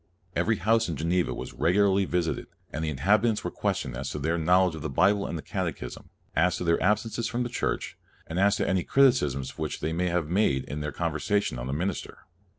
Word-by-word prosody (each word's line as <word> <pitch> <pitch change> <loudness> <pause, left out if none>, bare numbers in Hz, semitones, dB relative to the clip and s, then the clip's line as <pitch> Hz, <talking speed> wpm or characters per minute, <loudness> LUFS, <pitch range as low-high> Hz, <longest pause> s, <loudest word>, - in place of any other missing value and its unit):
Every 115 - +2
house 110 +2 +2
in 80 - -2
Geneva 85 +4 0
was - - -6
regularly 100 +2 +3
visited, 90 -2 -1 0.3
and 80 +3 -3
the 80 - 0
inhabitants 105 - +2
were - - -3
questioned 65 -2 -2
as 65 +2 -4
to - - -4
their 80 +4 0
knowledge 90 +2 +3
of 80 - -7
the 80 - -3
Bible 100 +8 +3
and 85 - -3
the 75 - -7
Catechism, 60 - -5 0.3
as 90 +2 +3
to - - -4
their 85 -1 +2
absences 105 +3 +1
from 120 +1 -1
church, - - -3 0.3
and 85 +3 -3
as 100 +1 +4
to - - -1
any 95 -2 +1
criti 135 -2 +4
cism 70 -1 -4
which - - -3
they 80 +2 -2
might 90 +2 0
have 85 -3 0
made 85 -7 +2
in 75 - -5
their 75 0 -3
conversation 85 - -1
on - - -4
the 65 - -2
minister. 90 +6 -4
90 Hz, 215 wpm, -27 LUFS, 80-100 Hz, 0.3 s, as